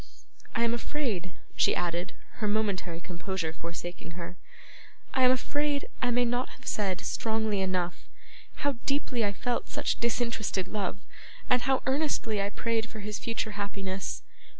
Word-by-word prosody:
I 235 - +3
am 235 0 +3
afraid,' 230 - -1 0.2
she - - +5
added, 175 0 0 0.2
her 215 -4 0
momentary 200 -5 +1
composure 175 -1 -2
forsaking 170 +1 -6
her, 175 0 -5 0.8
'I 260 - +4
am - - +8
afraid 290 +2 +1
I 245 - +3
may 245 0 +4
not 245 +1 +1
have 265 - -14
said, 195 -4 +1
strongly 220 -3 +1
enough, 185 -2 0 0.6
how 285 -3 +2
deeply 275 -4 +2
I 205 - +3
felt 240 +4 -1
such - - 0
disinterested 235 -5 +1
love, 200 -1 -1 0.5
and 250 0 +6
how 265 +1 +3
earnestly 265 -7 +2
I 200 - +1
prayed 230 +1 0
for 215 - -7
his 210 +1 -3
future 230 -1 -1
happiness. 195 -2 -2
215 Hz, 150 wpm, -30 LUFS, 185-245 Hz, 0.8 s, am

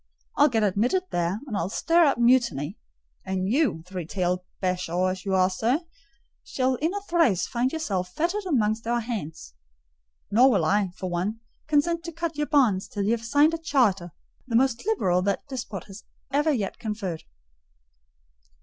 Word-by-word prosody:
I'll - - +6
get 225 -3 +1
admitted 220 - +1
there, 175 +5 -1
and 240 -7 -5
I'll 185 -2 -1
stir 335 +9 +3
up 280 - +2
mutiny; 235 - +2 0.5
and 190 -1 -2
you, 250 - +1
three 180 -3 -6
tailed 180 0 -1 0.2
bashaw 185 -1 0
as 185 +1 -7
you 195 -1 0
are, 185 -1 +4
sir, 235 +9 +1 0.6
shall 260 0 0
in 310 +7 -1
a 405 - -3
trice 330 - +2
find 250 +1 -1
yourself 195 - -2
fettered 375 +5 -1
amongst 225 -7 0
our 240 0 +1
hands: 160 - -6 0.8
nor 245 +6 +6
will 195 -10 +2
I, 200 +3 +2
for 185 - -4
one, 190 +6 -2 0.3
consent 330 +3 +1
to 335 - -5
cut 335 0 -4
your 295 0 -1
bonds 245 -11 +2
till 205 - -3
you 205 - +1
have 230 -1 -1
signed 290 +7 +3
a 330 - -2
charter, 225 - +1 0.4
the 235 - -2
most 255 - +2
liberal 185 - +2
that 200 +1 -1
despot 230 - -6 0.5
ever 295 +2 +3
yet 215 -9 -2
conferred." 205 -7 -4
225 Hz, 165 wpm, -25 LUFS, 185-285 Hz, 0.8 s, I'll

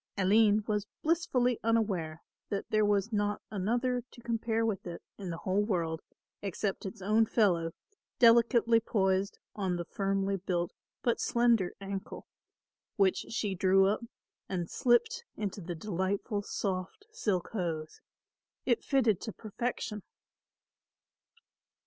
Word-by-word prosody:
Aline 210 +2 +4
was 210 -2 -1 0.2
blissfully 265 -8 +2
unaware 195 -9 0 0.3
that 200 -2 -2
there 215 0 +4
was 205 +1 +1
not 205 0 +1
another 240 +5 0
to 240 - -15
compare 225 -1 0
with 205 -5 -2
it 170 - -7 0.2
in 190 -3 -5
the 165 - -3
whole 190 +4 +1
world 170 -6 -1 0.4
except 195 0 -2
its 190 0 -8
own 215 +3 +4
fellow 175 -8 +2 0.5
delicately 235 0 +6
poised 195 -3 +1 0.2
on 190 -3 -1
the 175 0 -3
firmly 195 0 0
built 175 -2 -2 0.3
but 235 - +2
slender 235 -6 +2
ankle, 195 -1 -6 0.7
which 195 -2 +2
she 210 -3 -1
drew 190 +1 +4
up 210 +4 +1 0.5
and 175 -3 -3
slipped 450 - +2
into 205 -1 -3
the 175 0 -5
delightful 195 +3 -1
soft 195 - -3
silk 195 - -1
hose. 165 -6 -3 0.6
It 240 -3 +2
fitted 240 -8 +2
to 220 - -4
perfection. 215 0 -4
205 Hz, 125 wpm, -31 LUFS, 190-230 Hz, 0.7 s, delicately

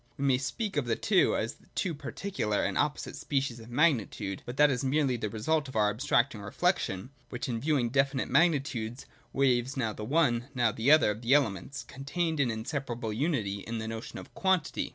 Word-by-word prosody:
We 140 - -2
may 130 -2 +3
speak 200 - -3
of 145 - +1
the 115 - +1
two - - +3
as - - -3 0.2
two 180 - 0
particular 145 - -2
and - - -1
opposite 150 0 -1
species 135 -4 -2
of 115 +1 -12
magnitude; 120 - +1
but 120 +2 -6
that 150 -1 +6
is 125 +1 -1
merely 135 -1 +2
the 110 -3 -3
result 140 +8 0
of 130 - -10
our 105 -1 +3
abstracting 120 -1 +1
reflection, 105 - -1 0.2
which 125 - -4
in 115 -3 -2
viewing 140 -5 +1
definite 135 +1 +1
magni 165 -4 +4
tudes 120 -3 -5 0.3
waives 130 -1 +1
now 115 -4 0
the 105 - -7
one, 125 -2 +2
now 120 -3 +3
the 115 +4 0
other, 155 -8 +6
of 105 +2 -6
the 125 +4 +4
elements 125 -1 0
contained 150 +5 -3
in 135 -3 +3
inseparable 120 -1 -3
unity 110 - -1
in 115 +4 -5
the 110 0 -4
notion 115 0 -6
of - - -10
quantity. 190 -4 0
130 Hz, 195 wpm, -29 LUFS, 115-145 Hz, 0.3 s, that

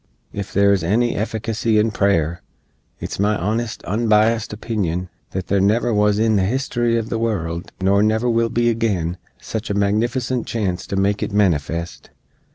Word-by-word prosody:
Ef 100 -1 -5
there 100 0 +4
is 95 -4 0
any 115 +7 +2
efficacy 110 +1 -1
in 110 +1 +3
prayer, 85 -6 +1 0.6
it's - - -5
my 105 +1 +2
honest, 115 +5 -2
unbiased 110 +1 +2
opinion 95 -5 -2 0.2
that 95 -1 -4
there 100 -1 +1
never 110 +4 +2
wuz 105 0 +3
in 110 -1 +2
the - - +2
history 120 +1 0
uv 115 -1 -2
the 115 - -2
world, 85 -7 -2
nor 100 +2 +3
never 110 +3 +2
will 115 -1 +2
be 120 +1 +1
agin, 95 -7 -1 0.2
sich 110 -1 -5
a 100 - -1
magnificent 120 +5 0
chance 95 -6 -2
to - - -3
make 100 +1 +1
it - - -2
manifest. 85 -4 -1
105 Hz, 165 wpm, -20 LUFS, 95-115 Hz, 0.6 s, there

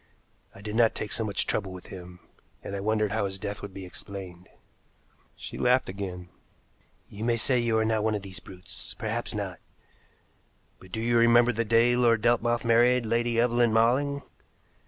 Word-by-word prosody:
I 95 - -12
did 105 +1 -5
not 115 -1 +4
take 105 - -4
so 115 - 0
much 100 -3 0
trouble 95 -3 -1
with 90 -1 -10
him, 90 -1 -11 0.4
and 100 - -5
I - - -3
wondered 105 0 0
how 110 -1 0
his 95 0 -4
death 100 0 -5
would 100 - -7
be 95 0 -8
explained." 90 0 -9 0.9
She - - -8
laughed 125 -2 +3
again. 95 -2 -6 0.8
"You 105 +2 -8
may 115 0 +1
say 125 +2 +2
you 115 -2 +1
are 110 - +2
not 110 -1 +1
one 110 -1 +1
of 100 - -4
these 95 -2 -7
brutes 90 -1 -7
perhaps - - -3
not. - - -4 1.2
But 95 - -16
do 110 - -4
you 120 +1 +2
remember 120 +1 +5
the 115 +2 0
day 115 +2 +4
Lord 115 -3 +3
Delmouth 120 0 +2
married 120 +1 +4
Lady 115 +1 +1
Evelyn 120 -1 +3
Malling? 135 +5 +2
110 Hz, 180 wpm, -27 LUFS, 100-120 Hz, 1.2 s, remember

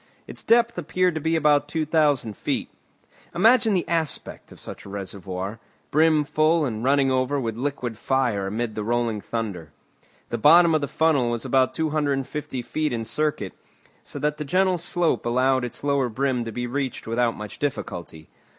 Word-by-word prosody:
Its - - -7
depth 235 -3 +3
appeared 180 +2 +1
to 155 - -3
be 160 +2 +1
about 150 -2 +3
two 155 +1 -2
thousand 145 -8 +1
feet. - - -2 0.7
Imagine 220 +2 +4
the 180 - -1
aspect 165 -3 -3
of - - -13
such - - -9
a - - -11
reservoir, 95 +1 -5 0.3
brim 155 0 +4
full 155 +2 +2
and 110 -3 -3
running 135 0 +3
over 130 +2 +1
with 115 -4 -3
liquid 125 -3 -3
fire 120 -7 0
amid 110 +3 -3
the 105 - -4
rolling 115 -1 -1
thunder. 100 -10 -5 0.6
The 120 - -3
bottom 165 +6 +7
of 155 - +2
the 145 - -1
funnel 145 -4 +2
was 120 -1 -3
about 130 -1 +2
250 145 -3 -2
feet 155 +4 -2
in 115 -2 -3
circuit, 135 -4 -1 0.5
so - - -7
that 150 0 -1
the 150 - -3
gentle 185 +3 +2
slope 170 0 0
allowed 130 +2 +2
its 125 - -6
lower 140 -3 +1
brim 125 0 -1
to 115 - -5
be 120 +2 -3
reached 130 +1 -3
without 115 +1 0
much 105 -1 -8
difficulty. 85 - -4
135 Hz, 175 wpm, -24 LUFS, 115-155 Hz, 0.7 s, bottom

